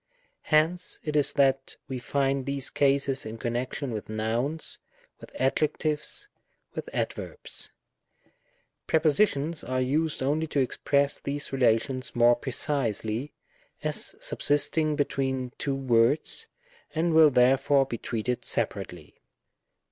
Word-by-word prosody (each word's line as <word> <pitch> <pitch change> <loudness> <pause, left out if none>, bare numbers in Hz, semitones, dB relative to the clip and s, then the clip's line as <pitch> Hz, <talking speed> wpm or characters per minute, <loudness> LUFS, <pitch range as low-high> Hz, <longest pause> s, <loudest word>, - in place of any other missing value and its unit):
Hence 165 +4 +2
it 150 -1 -3
is 145 -2 +4
that 135 -1 +1
we 130 -1 -4
find 135 +1 0
these 140 -1 -1
cases 140 -1 +2
in 110 +1 -7
connection 120 +4 -3
with 110 -2 -5
nouns, 115 +8 -1 0.4
with - - -13
adjectives, 150 - -1 0.5
with - - -5
adverbs; - - -4 1.2
prepositions 155 -1 +2
are 130 +1 -2
used 150 +4 0
only 155 +4 0
to 145 - -1
express 140 +2 +1
these 140 0 -4
relations 130 +1 +1
more 120 0 +6
precisely, 120 -1 -2 0.5
as - - -1
subsisting 155 - +2
between 130 -3 -1
two 140 -2 -1
words, 135 - +2 0.5
and 165 +1 +1
will 160 -1 +8
therefore 135 +2 +4
be 120 -4 -5
treated 120 +2 -2
separately. - - -3
140 Hz, 110 wpm, -27 LUFS, 125-150 Hz, 1.2 s, will